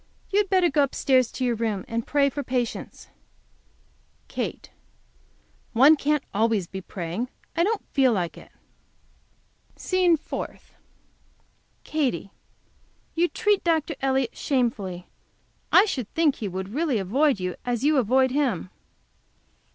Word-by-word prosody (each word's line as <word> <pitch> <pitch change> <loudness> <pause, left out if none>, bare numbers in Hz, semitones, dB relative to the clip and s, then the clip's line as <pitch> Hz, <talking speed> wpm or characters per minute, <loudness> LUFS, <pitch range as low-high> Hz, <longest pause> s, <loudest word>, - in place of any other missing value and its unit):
You 400 - +3
had 405 -2 +1
better 370 -3 +3
go 295 - +3
upstairs 260 -2 +2
to 255 - -2
your 245 - +2
room 220 -4 -2
and 230 0 -3
pray 280 -1 +2
for 285 - -3
patience. 250 -3 -4 1.2
Katy. - - -5 1.0
One 275 +7 +7
can't 300 -1 0
be - - -37
always 215 -2 +1 0.2
praying. 180 +6 -4 0.3
I 335 - +3
don't 430 +3 -1
feel 265 -3 +4
like 180 -6 -1
it. - - -14 1.2
SCENE 365 -3 +2
FOURTH. - - -7 1.1
Katy. 255 - -1 0.8
You 340 +1 +2
treat 415 +1 +1
Dr. 325 -2 +1
Elliott 265 -2 0
shamefully. 210 -9 -1 0.6
I 385 - +7
should 255 - -4
think 320 -4 +3
he 215 - -4
would 190 0 -5
really 295 -3 +1
avoid 250 +6 +2
you 180 -1 -3
as 245 -1 -2
you 300 +1 +3
avoid 260 +2 +3
him. 250 - -1
260 Hz, 130 wpm, -25 LUFS, 220-310 Hz, 1.2 s, One